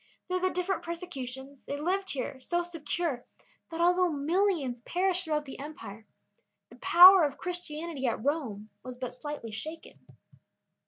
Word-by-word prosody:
Through 365 0 0
the 370 +1 +2
different 365 +1 -1
persecutions, 275 -6 -7
they 285 - -4
lived 380 +5 -1
here 260 0 -4
so 345 +6 -1
secure 330 -5 -3 0.5
that 330 0 -4
although 360 +1 +4
millions 305 - 0
perished 365 +4 0
throughout 300 -2 -1
the 270 - -9
empire, 225 -8 -9 0.6
the - - -14
power 365 +1 +9
of 285 -2 0
Christianity 335 -5 -4
at 230 0 -2
Rome 230 -9 -2
was 255 -1 -8
but 255 -1 -5
slightly 270 -3 -6
shaken. 315 +9 -7
310 Hz, 145 wpm, -29 LUFS, 265-355 Hz, 0.6 s, power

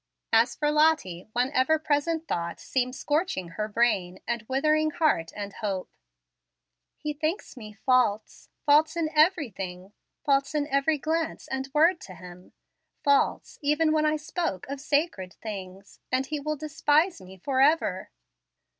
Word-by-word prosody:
As 230 +2 +4
for 295 -1 0
Lottie, 300 - +2
one 250 +2 +1
ever 290 +4 +3
present 310 +2 -1
thought 170 0 -3
seemed 255 -1 -1
scorching 295 - -1
her 210 +6 -3
brain 205 -5 +1
and 235 -1 -1
withering 305 +4 +2
heart 300 - +1
and 205 -1 -6
hope. 195 -3 -4 1.1
"He 300 -1 -4
thinks 310 +5 -3
me 215 -4 -10
false, 250 -5 +1 0.2
false 300 +3 +4
in 320 -2 0
everything, 210 - 0 0.3
false 275 +1 +2
in 295 -1 +1
every 280 +3 +2
glance 320 +2 -2
and 265 0 -4
word 330 +4 +3
to 185 - -10
him, 180 0 -13 0.5
false 280 -1 +1
even 300 +2 +2
when 310 0 +2
I 305 - +2
spoke 305 - -3
of 280 0 -5
sacred 285 - -1
things; 195 -2 -8
and 260 +1 +1
he 300 +2 -3
will 305 +2 -2
despise 305 - +1
me 190 +1 -12
forever." 275 - +2
275 Hz, 145 wpm, -27 LUFS, 210-310 Hz, 1.1 s, As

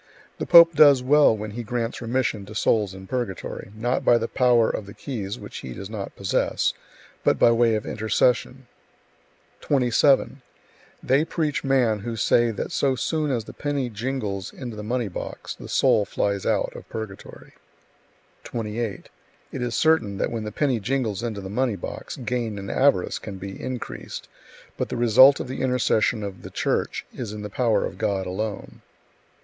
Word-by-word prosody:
The - - -3
pope 170 -1 +9
does 145 -4 +6
well 140 -3 +5
when 105 0 -6
he 120 +3 -5
grants 115 +1 -3
remission 115 -3 -1
to 110 - -10
souls 105 -3 +1
[in 95 0 -10
purgatory], 110 -5 -4
not 120 +4 -1
by 120 - +5
the 115 0 -2
power 120 -3 +3
of 105 - -3
the 100 - -11
keys 110 -6 -5
(which - - -9
he 65 - -7
does 100 +2 -8
not 105 -3 -6
possess), 100 -1 0 0.5
but - - +3
by 115 - +5
way 115 -1 +3
of 105 - -3
intercession. 125 +4 0 0.9
27. 135 0 +2 0.6
They 135 +4 +3
preach 155 -3 -2
man 125 -6 +2
who 115 +3 -5
say 120 +2 +3
that 110 - -4
so 135 -2 +1
soon 155 +5 -1
as 120 -4 -1
the - - -11
penny 140 -4 -2
jingles 105 -4 -3
into 120 -4 -7
the 105 - -6
money 120 +2 -1
box, 90 - -6
the - - -11
soul 105 - +3
flies 100 -1 -1
out - - 0
[of - - -11
purgatory]. 110 -3 -8 0.9
28. 115 -2 -4 0.4
It 130 - -5
is 120 -1 -2
certain 140 -12 +2
that - - -1
when 115 -2 -3
the 105 - -4
penny 130 0 0
jingles 110 -2 -1
into 110 -4 -4
the 95 - -7
money 115 +3 0
box, 90 - -7
gain 120 -3 -3
and 100 0 -5
avarice 130 -9 +2
can 100 -3 -8
be 95 +1 -8
increased, 130 -2 -6 0.5
but - - -2
the - - -3
result 125 +4 +7
of - - -4
the 130 - -5
intercession 125 -4 +1
of 100 -2 -6
the - - -9
Church - - -1
is 115 -4 -6
in 105 -1 -7
the 105 - -6
power 115 -2 +1
of - - -7
God 95 -2 0
alone. 100 +3 -5
115 Hz, 175 wpm, -24 LUFS, 105-130 Hz, 0.9 s, pope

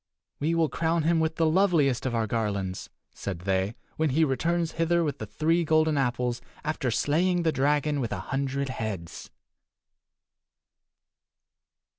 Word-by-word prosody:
"We 160 +4 +1
will 165 -1 +3
crown 165 +1 0
him 165 +1 +3
with 160 0 0
the 165 - +2
loveliest 155 - +3
of 120 - -2
our 115 -1 +1
garlands," 100 -4 -2 0.2
said 95 -4 -5
they, 95 +3 0 0.2
"when 160 -1 +2
he 155 +5 +3
returns 165 +4 0
hither 170 +1 +1
with 145 -4 -2
the 110 - -5
three 160 - +1
golden 155 -1 +3
apples 125 -2 0 0.2
after 150 -4 -1
slaying 170 +9 +1
the 160 - +2
dragon 145 +1 +1
with 120 -4 -2
a 100 - -2
hundred 140 0 -1
heads." 105 -9 -5
145 Hz, 145 wpm, -27 LUFS, 120-160 Hz, 0.2 s, will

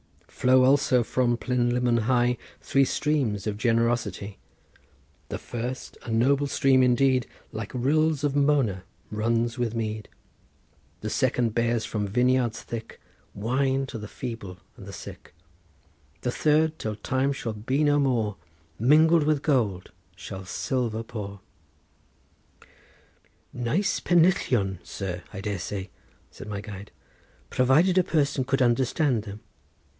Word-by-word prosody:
Flow 130 0 +3
also 130 -2 +4
from 120 0 +1
Plynlimmon 120 -1 +1
high 125 0 +2 0.2
Three 135 0 +2
streams 130 -10 0
of 105 -1 -2
generosity; 115 -4 0 0.9
The - - -3
first, 125 +2 -6
a - - -9
noble 135 +5 +2
stream 135 -1 +3
indeed, 130 0 +3 0.2
Like 110 -2 -6
rills 150 +4 +1
of 145 -1 0
Mona 140 -10 +2 0.3
runs 115 +3 0
with 120 -2 -1
mead; 110 -1 -3 0.9
The - - -4
second 120 -3 +1
bears 115 -1 +1
from 105 -2 -2
vineyards 125 +1 +1
thick 115 -1 -7 0.4
Wine 130 +5 0
to 130 -3 -7
the 105 - -7
feeble 115 -7 -7 0.2
and - - -12
the - - -8
sick; - - -10 0.9
The 125 - -1
third, 155 +3 +2
till 110 -1 -3
time 130 +5 0
shall 120 -5 -4
be 130 +8 -1
no 145 0 +3
more, 115 -7 0 0.4
Mingled 155 +6 +5
with 150 -2 +1
gold 110 - 0 0.2
shall 95 0 -8
silver 115 +2 -2
pour." 100 -4 -7 2.1
"Nice 125 - 0
pennillion, 135 - +2
sir, 95 -2 -5
I 100 - -7
dare 100 -2 -3
say," 95 +2 -5 0.4
said - - -10
my 100 -1 -4
guide, 105 -1 -9 0.6
"provided 155 +9 +4
a - - +4
person 145 -5 +1
could 135 +1 +1
understand 125 +1 +2
them. 105 0 -8
120 Hz, 130 wpm, -26 LUFS, 110-135 Hz, 2.1 s, Mingled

